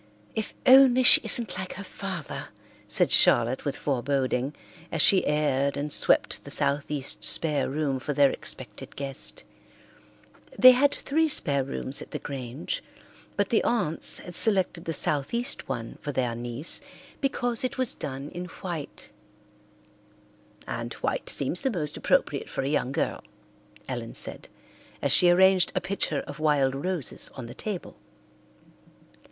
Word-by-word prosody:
"If 220 - -4
only 260 -1 +6
she - - +9
isn't 225 -7 +1
like 185 0 -5
her 200 - -7
father," 190 -5 -6 0.4
said - - +1
Charlotte 120 +2 +4
with 140 - -2
foreboding, 135 0 -2 0.4
as 165 - -3
she 190 +5 +5
aired 140 -2 0
and 145 +1 -3
swept - - +2
the - - -11
southeast 140 0 -2
spare 150 -3 +3
room 140 -1 -2
for 130 - -4
their 140 -1 +3
expected - - -5
guest. 135 -1 -1 1.1
They 255 +1 +9
had 275 +3 +3
three 320 +4 0
spare 140 - +2
rooms 135 0 -4
at - - -10
the - - -5
Grange, 135 +1 -6 0.6
but 205 -1 0
the 225 - +2
aunts 195 -10 0
had 175 - -9
selected 185 -3 0
the 165 - -3
southeast 155 - 0
one 115 -4 -6
for 145 - -4
their 125 -3 -1
niece 120 +6 -1 0.4
because 245 -4 -1
it 255 - -3
was 255 -2 +3
done 135 +1 -7
in 175 +1 -6
white, 170 -3 -8 1.6
"and - - -5
white - - -3
seems 140 +6 -2
the 265 - 0
most 155 - -3
appropriate - - 0
for - - -4
a - - -2
young 140 -3 -1
girl," - - -3 0.6
Ellen - - -6
said, - - +5 0.5
as - - 0
she 175 - +6
arranged 185 +1 +4
a - - +2
pitcher 195 -7 -2
of 145 - -10
wild 145 -4 +1
roses 145 - -1
on 130 - -7
the 120 - -9
table. 200 +4 -6
150 Hz, 145 wpm, -26 LUFS, 135-195 Hz, 1.6 s, she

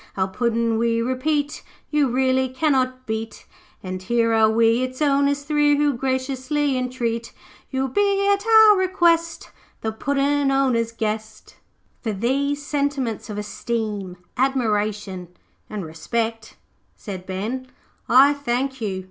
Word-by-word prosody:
'Our 190 0 0
Puddin', 230 +1 0
we 230 0 +1
repeat, 285 +5 -1 0.3
You 300 -2 +3
really 260 +1 +1
cannot 255 -2 0
beat, 220 0 -5 0.4
And 185 0 -5
here 230 +3 +1
are 220 -1 +5
we 230 +2 +3
its 255 0 -4
owners 285 -1 +2
three 295 0 +2
Who 290 -1 +2
graciously 260 +2 -1
intreat 240 -2 -2 0.4
You'll 265 0 -1
be 400 +6 +1
at 400 0 -2
our 440 -2 +7
request, 340 -3 +1 0.3
The 220 - -2
Puddin' 280 +4 0
owners' 255 -4 +1
guest.' 220 -1 -5 0.4
'For 220 -3 -2
these 280 +7 -1
sentiments 280 -7 -2
of 210 - -5
esteem, 210 -3 -4 0.2
admiration, 210 -7 -1 0.4
and 205 -4 -5
respect,' 225 +8 -3 0.4
said 185 -4 -8
Ben, 220 +8 -4 0.4
'I 270 +4 +7
thank 265 -1 -2
you. 195 -4 -2
255 Hz, 125 wpm, -22 LUFS, 220-280 Hz, 0.4 s, our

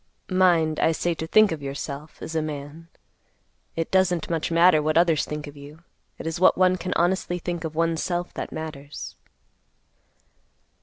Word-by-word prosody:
Mind, 170 -4 +3
I 165 - +3
say 175 +2 0
to 160 0 -5
think 215 +3 +5
of 160 -3 -4
yourself, 140 +2 -6
as 165 - -6
a 160 - +1
man. 150 +2 -7 0.9
It 165 0 -3
doesn't 180 -3 +2
much 165 -2 -1
matter 170 -1 +5
what 155 +1 +1
others 165 -3 +3
think 150 0 -5
of 145 0 -11
you. 145 +3 -13 0.3
It - - -8
is 165 +1 -3
what 185 - +5
one 185 0 +4
can 180 0 -3
honestly 175 0 +1
think 175 -1 -4
of 160 -1 -5
one's 165 0 +1
self 175 0 -2
that - - -5
matters." 150 -2 -7
165 Hz, 170 wpm, -24 LUFS, 155-175 Hz, 0.9 s, think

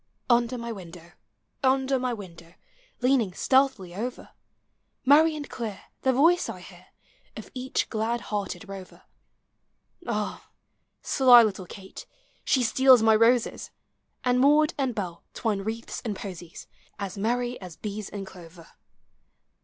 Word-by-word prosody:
Under 240 +1 +2
my 235 0 -5
window, 175 -4 -10 0.5
under 265 0 +2
my 250 0 -1
window, 175 -6 -10 0.5
Leaning 245 -7 +2
stealthily 260 -10 +2
over, 240 +6 -5 0.8
Merry 310 +4 +6
and 295 -1 -6
clear, 220 -5 -6 0.2
the 265 - +3
voice 330 +7 +3
I - - -6
hear, - - -15 0.5
Of - - -9
each 255 0 -2
glad 230 +2 -2
hearted 205 0 -4
rover. 195 -2 -10 1.0
Ah! 210 -3 -3 0.5
sly 250 -3 +7
little 195 -4 -2
Kate, 190 +1 -11 0.4
she 260 - +2
steals 255 0 +5
my 220 -1 +5
roses; 230 +2 +2 0.5
And 250 0 +2
Maud 300 +4 +4
and 265 -5 -2
Hell 175 -4 -5
twine 215 -4 -1
wreaths 225 +3 -5
and 215 -4 -3
posies, 180 -4 -9 0.3
As 200 -3 -5
merry 240 +4 -1
as 180 -3 -9
bees 210 +1 -6
in 200 -1 -6
clover. 170 -3 -14
225 Hz, 130 wpm, -26 LUFS, 195-255 Hz, 1.0 s, sly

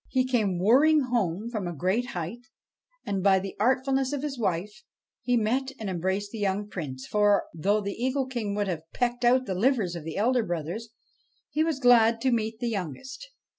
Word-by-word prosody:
He 255 -1 +1
came 220 -8 +1
whirring 275 - +5
home 210 -1 -1
from 210 -6 -3
a 175 - -4
great 190 - 0
height, 175 +5 -5 0.7
no - - -4
BASHTCHELIK - - 0
and, 190 -2 -1
by 195 -1 +5
the 190 0 -4
artfulness 265 +3 +1
of 285 -1 -3
his 280 -4 -4
wife, 205 +4 -2 0.4
he 245 -1 +1
met 255 +5 0
and 210 -3 -3
embraced 190 +3 -2
the 225 - -6
young 205 0 -1
Prince; 135 -10 -6
for, 205 -1 +3
though 200 +6 +1
the 200 0 -3
Eagle 260 +3 -1
King 235 -6 -3
would 205 -1 0
have 165 -3 -5
pecked 245 0 -1
out 255 +2 +4
the 190 - -2
livers 205 -3 +1
of 170 - -6
the 160 +2 -6
elder 245 +4 +2
brothers, 175 +4 -4 0.6
he 310 - +1
was 320 -4 -1
glad 235 -3 +5
to 265 - +2
meet 220 -1 -1
the 240 +1 -2
youngest. 230 - -6
220 Hz, 205 wpm, -27 LUFS, 190-255 Hz, 0.7 s, whirring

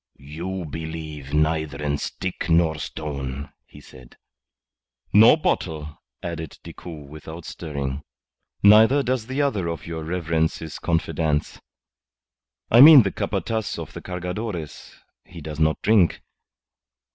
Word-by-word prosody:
"You 85 +6 -6
believe 80 -2 -7
neither 75 -1 0
in 75 -1 -1
stick 90 -1 -4
nor 80 -2 +3
stone," 70 -2 -5 0.2
he - - -15
said. 65 -2 -16 1.0
"Nor 110 +9 +8
bottle," 80 - -3 0.2
added 80 -3 -6
Decoud 80 -5 -10
without 80 +3 -10
stirring. 70 -3 -5 0.6
"Neither 110 +7 +6
does 125 -3 -1
the 135 +3 -1
other 105 -11 -1
of 85 -1 -5
your 80 -1 -5
reverence's 80 -2 -2
confidants. 80 -2 -1 1.1
I 120 - +8
mean 145 -3 +11
the 95 - -1
Capataz 110 -2 -3
of 80 -1 -7
the - - -8
Cargadores. 90 -2 -6 0.3
He 85 - -12
does 75 0 -7
not 80 0 +2
drink. 105 -7 +3
80 Hz, 120 wpm, -23 LUFS, 75-95 Hz, 1.1 s, mean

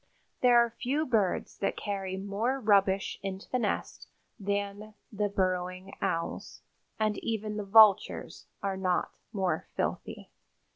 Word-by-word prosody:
There 245 -1 +6
are 235 -1 +4
few 270 +6 -1
birds 215 -9 0
that 195 - -1
carry 195 -2 -3
more 205 +7 -1
rubbish 195 -4 +2
into 195 0 -5
the 255 - +1
nest 215 -4 -3 0.3
than 205 +1 -3 0.2
the 205 -1 -1
Burrowing 185 0 -2
Owls, 165 0 -3 0.4
and 215 -1 +1
even 215 -2 -3
the 210 - -2
vultures 210 -1 +4 0.2
are 195 -1 -1
not 185 -2 0 0.2
more 185 -7 -1
filthy." - - -3
200 Hz, 130 wpm, -29 LUFS, 190-220 Hz, 0.4 s, There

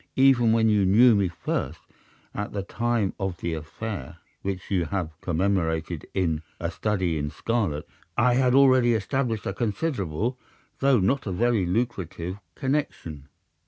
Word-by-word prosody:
Even 130 -4 +5
when 110 0 +3
you 105 -2 +3
knew 115 +6 +6
me 100 -3 +2
first, 85 - -3 0.5
at 105 - -4
the 100 -1 -2
time 115 -1 -1
of 95 -3 -2
the 85 - -3
affair 80 - -6 0.2
which 95 -1 -4
you 90 -3 +2
have 90 -2 -2
commemorated 85 -3 -1
in 85 -5 0 0.2
'A 85 0 -2
Study 95 -5 -1
in 75 0 -2
Scarlet,' 100 -8 -2 0.3
I 120 +1 +4
had 125 0 +3
already 130 -3 +5
established 115 +1 -1
a - - -2
considerable, 110 - -2 0.4
though 135 -1 +4
not 120 +7 +1
a - - -1
very 110 -1 +1
lucrative, 95 -3 -2 0.2
connection. 130 - -3
100 Hz, 145 wpm, -26 LUFS, 85-120 Hz, 0.5 s, knew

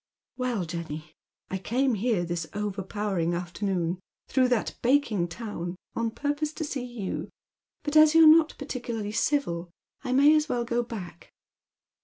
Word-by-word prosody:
" - - -67
Well, 245 -7 -1
Jenny, 155 -2 -6 0.4
I 190 - -2
came 255 +6 +1
here 215 -4 +1
this 170 -2 -3
overpowering 195 -3 -1
afternoon, 180 0 -2 0.3
through 260 -2 +3
that 245 -3 0
baking 235 -8 +2
town, 175 -2 -5 0.2
on 230 0 0
purpose 290 +5 -2
to 320 - -4
see 280 -4 -3
you, 240 -6 -5 0.5
but 295 0 -3
as 310 0 +7
you're 325 0 +9
not 315 0 +7
particularly 235 -6 -4
civil 195 - 0 0.3
I 255 - -3
may 285 +3 +6
as 305 0 +1
well 240 -1 0
go 235 +1 +1
back." 190 -8 -8
225 Hz, 150 wpm, -27 LUFS, 180-270 Hz, 0.5 s, you're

